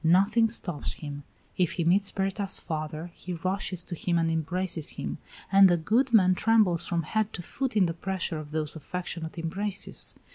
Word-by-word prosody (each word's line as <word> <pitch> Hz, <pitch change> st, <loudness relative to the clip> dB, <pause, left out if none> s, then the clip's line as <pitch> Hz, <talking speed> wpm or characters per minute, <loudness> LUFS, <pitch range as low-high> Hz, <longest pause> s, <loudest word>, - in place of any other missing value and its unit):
Nothing 200 Hz, +7 st, +4 dB
stops 175 Hz, -8 st, -2 dB
him. 145 Hz, -2 st, -7 dB, 0.4 s
If 180 Hz, -3 st, +2 dB
he 170 Hz, -, -1 dB
meets 195 Hz, +4 st, +3 dB
Berta's 195 Hz, 0 st, -1 dB
father, 155 Hz, +1 st, -4 dB
he 180 Hz, -, -7 dB
rushes 185 Hz, +1 st, -2 dB
to 180 Hz, -, -6 dB
him 170 Hz, +1 st, 0 dB
and 165 Hz, -1 st, +2 dB
embraces 165 Hz, 0 st, -1 dB
him, -, -, -4 dB, 0.3 s
and 195 Hz, -1 st, +8 dB
the 175 Hz, -, +4 dB
good 230 Hz, +11 st, +2 dB
man 185 Hz, -5 st, +6 dB
trembles 205 Hz, -4 st, +3 dB
from 170 Hz, -1 st, 0 dB
head 215 Hz, +6 st, 0 dB
to 175 Hz, -, -5 dB
foot 260 Hz, +4 st, -2 dB
in 195 Hz, -, +5 dB
the 165 Hz, -, -1 dB
pressure 175 Hz, -2 st, -3 dB
of 150 Hz, -1 st, -8 dB
those 155 Hz, 0 st, -2 dB
affectionate 170 Hz, +1 st, -5 dB
embraces. 190 Hz, +5 st, -2 dB
180 Hz, 180 wpm, -28 LUFS, 165-195 Hz, 0.4 s, and